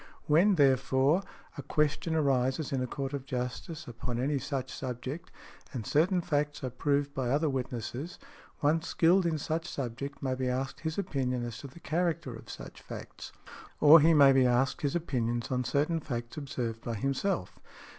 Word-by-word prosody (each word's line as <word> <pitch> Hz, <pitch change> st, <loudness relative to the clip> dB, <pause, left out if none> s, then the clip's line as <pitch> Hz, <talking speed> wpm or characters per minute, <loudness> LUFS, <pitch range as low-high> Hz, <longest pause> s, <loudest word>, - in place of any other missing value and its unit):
When, 175 Hz, +7 st, +5 dB
therefore, 135 Hz, +2 st, +3 dB, 0.4 s
a -, -, -2 dB
question 155 Hz, +3 st, 0 dB
arises 135 Hz, 0 st, +1 dB
in 130 Hz, -, 0 dB
a 125 Hz, -, -1 dB
court 135 Hz, +2 st, -4 dB
of 140 Hz, -2 st, -3 dB
justice 130 Hz, +5 st, -5 dB
upon 120 Hz, 0 st, -4 dB
any 140 Hz, +2 st, 0 dB
such 135 Hz, -2 st, -3 dB
subject, 130 Hz, +5 st, -5 dB, 0.4 s
and 120 Hz, -5 st, -4 dB
certain 175 Hz, +4 st, +2 dB
facts 145 Hz, -3 st, -1 dB
are 130 Hz, -, -2 dB
proved 140 Hz, +2 st, 0 dB
by 130 Hz, -3 st, -1 dB
other 150 Hz, +5 st, +2 dB
witnesses, 130 Hz, +5 st, -4 dB, 0.4 s
one 155 Hz, +3 st, +3 dB
skilled 170 Hz, +2 st, +3 dB
in 160 Hz, -2 st, 0 dB
such 160 Hz, +2 st, -2 dB
subject 140 Hz, +2 st, -5 dB
may 130 Hz, -1 st, 0 dB
be 130 Hz, 0 st, -1 dB
asked 130 Hz, +2 st, -2 dB
his 160 Hz, 0 st, -3 dB
opinion 130 Hz, -9 st, -1 dB
as 120 Hz, -1 st, -6 dB
to 140 Hz, -, -8 dB
the 135 Hz, +6 st, -14 dB
character 165 Hz, -6 st, -1 dB
of 115 Hz, -, -12 dB
such -, -, -9 dB
facts; -, -, -9 dB, 0.5 s
or 155 Hz, +2 st, +9 dB
he 160 Hz, +2 st, +5 dB
may 140 Hz, -2 st, +8 dB
be 130 Hz, -1 st, +5 dB
asked 125 Hz, +2 st, +1 dB
his 145 Hz, +1 st, 0 dB
opinions 120 Hz, -8 st, -1 dB
on 125 Hz, 0 st, +1 dB
certain 150 Hz, +6 st, +1 dB
facts 120 Hz, -5 st, -5 dB
observed 120 Hz, -6 st, -4 dB
by 115 Hz, -, -3 dB
himself. 135 Hz, -, -1 dB
140 Hz, 175 wpm, -30 LUFS, 125-155 Hz, 0.5 s, or